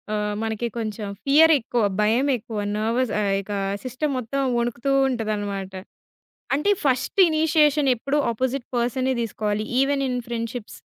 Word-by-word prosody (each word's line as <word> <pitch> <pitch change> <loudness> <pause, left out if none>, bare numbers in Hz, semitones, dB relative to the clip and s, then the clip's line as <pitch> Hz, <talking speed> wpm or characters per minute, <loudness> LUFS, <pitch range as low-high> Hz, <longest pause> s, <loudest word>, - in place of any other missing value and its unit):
ఆహ్, 210 0 -1
మనకి 220 +1 -2
కొంచెం 215 -2 -4 0.2
ఫియరేక్కువ, 280 -5 +4 0.2
భయమేక్కువ, 230 0 +1 0.2
నెర్వస్ 230 +2 0
ఆహ్, 200 -2 +1
ఇక 200 - -11 0.3
సిస్టమ్ 260 +3 -2
మొత్తం 255 +3 -3 0.2
వణుకుతూ 240 +3 -1 0.2
ఉంటదన్నమాట. 205 -5 -3 0.8
అంటే, 300 +9 +1
ఫస్ట్ 260 +6 0
ఇనిషియేషన్ 305 -2 +3
ఎప్పుడు 275 +5 -1
అపోజిట్ 255 +2 -2
పర్సనే 255 +2 0
దీసుకోవాలి 215 -1 -2
ఈవెన్ 275 0 +1
ఇన్ 250 -1 -1
ఫ్రెండ్షిప్స్. 230 -1 -5
240 Hz, 120 wpm, -23 LUFS, 220-275 Hz, 0.8 s, ఫియరేక్కువ